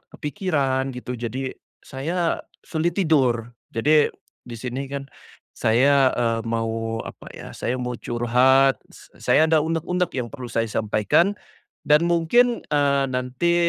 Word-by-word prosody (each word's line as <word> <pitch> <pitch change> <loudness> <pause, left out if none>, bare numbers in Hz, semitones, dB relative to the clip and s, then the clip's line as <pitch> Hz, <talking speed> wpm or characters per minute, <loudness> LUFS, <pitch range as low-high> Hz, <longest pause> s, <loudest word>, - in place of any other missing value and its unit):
kepikiran 145 -6 -1
gitu 125 0 -6
jadi 125 +3 -4 0.3
saya 165 +6 -2 0.2
sulit 170 +3 -1
tidur. 125 - +2 0.2
Jadi 150 +6 +3 0.3
di 120 -1 -8
sini 130 +2 -5
kan 140 -1 -5 0.5
saya, 130 +4 +4
eee, 115 -1 0
mau 115 0 -2
apa - - -10
ya, - - -10
saya 125 +1 -2
mau 125 0 -3
curhat, 125 +4 +3 0.2
se - - -17
saya 160 +1 +4
ada 155 -1 +3
unek-unek 170 +2 -1
yang 125 -3 -3
perlu 125 -1 -9
saya 115 0 0
sampaikan 110 - +2 0.6
dan 150 +3 +5
mungkin, 175 +9 +3
eee, 140 -2 +2
nanti 130 +6 -1
135 Hz, 130 wpm, -23 LUFS, 120-155 Hz, 0.6 s, dan